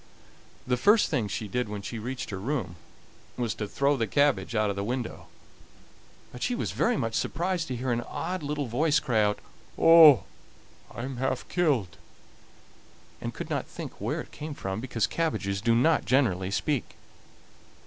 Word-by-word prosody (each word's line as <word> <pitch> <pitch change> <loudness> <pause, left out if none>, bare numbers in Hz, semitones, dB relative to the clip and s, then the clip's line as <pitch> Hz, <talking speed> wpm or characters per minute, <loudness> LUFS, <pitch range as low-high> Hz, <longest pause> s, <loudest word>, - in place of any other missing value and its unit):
The 125 0 +1
first 210 - +4
thing 125 -9 0
she 105 +2 -4
did 125 +2 -2
when 105 -1 -5
she 115 +2 -5
reached 125 +2 -5
her 95 - -4
room 120 -5 -3 0.6
was 120 -3 -1
to 105 - -4
throw 140 +6 +1
the 115 -4 -1
cabbage 125 -5 +1
out 105 -1 +2
of - - -5
the 100 - -2
window. 120 +2 -4 1.0
But 125 - -10
she 245 - 0
was - - -2
very 235 -1 +1
much 115 -2 -2
surprised 175 +3 -1
to 130 - -3
hear 125 +1 -2
an 120 0 0
odd 180 +8 -4
little 145 0 -2
voice 145 +6 +2
cry 115 -4 +1
out: 105 0 +1 0.4
"Oh! 160 - +8 0.7
I 120 - -7
am 130 -1 -5
half 130 0 -2
killed!" 135 - 0 1.2
and - - -3
could - - -7
not - - -2
tell - - -6
where - - -2
it - - -13
came 150 -1 -7
from, 95 -1 -4
because 120 -3 0
cabbages 100 -12 -1
do 115 +1 +3
not 155 +7 +3
generally 105 -9 +2
speak. 135 +6 -2
125 Hz, 175 wpm, -27 LUFS, 110-150 Hz, 1.2 s, Oh